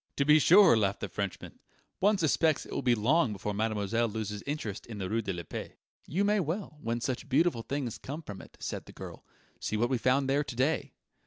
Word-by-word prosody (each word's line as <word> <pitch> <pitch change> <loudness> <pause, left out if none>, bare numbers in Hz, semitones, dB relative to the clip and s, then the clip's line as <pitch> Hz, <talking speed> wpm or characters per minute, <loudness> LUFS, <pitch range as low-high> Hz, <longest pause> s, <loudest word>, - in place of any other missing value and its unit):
"To 140 - +1
be 150 +1 +7
sure," 180 - +7
laughed 100 -3 0
the - - -2
Frenchman; 100 -3 -5 0.4
"one 205 +2 +4
suspects 160 -2 +2
it - - -12
will - - -1
be 120 -1 +3
long 125 +3 +2
before 105 +1 -4
mademoiselle 110 +2 0
loses 105 -1 -4
interest 125 -9 -4
in 115 -3 -7
the 95 -2 -3
rue 115 +1 +1
de 100 - -3
la 85 -2 -5
Paix." - - -7 0.3
"You 185 +7 0
may 210 +1 +3
well, 165 -2 -3
when 115 +1 -2
such 130 +3 -3
beautiful 140 -3 +2
things 135 -2 -4
come 150 +5 -6
from 100 -8 -8
it," - - -16
said - - -5
the - - -12
girl. - - -9 0.4
"See 105 - -2
what 120 +4 +1
we 130 - +1
found 130 +3 +2
there 140 +2 +2
to 120 - -7
day." 135 +6 0
125 Hz, 225 wpm, -30 LUFS, 110-155 Hz, 0.4 s, be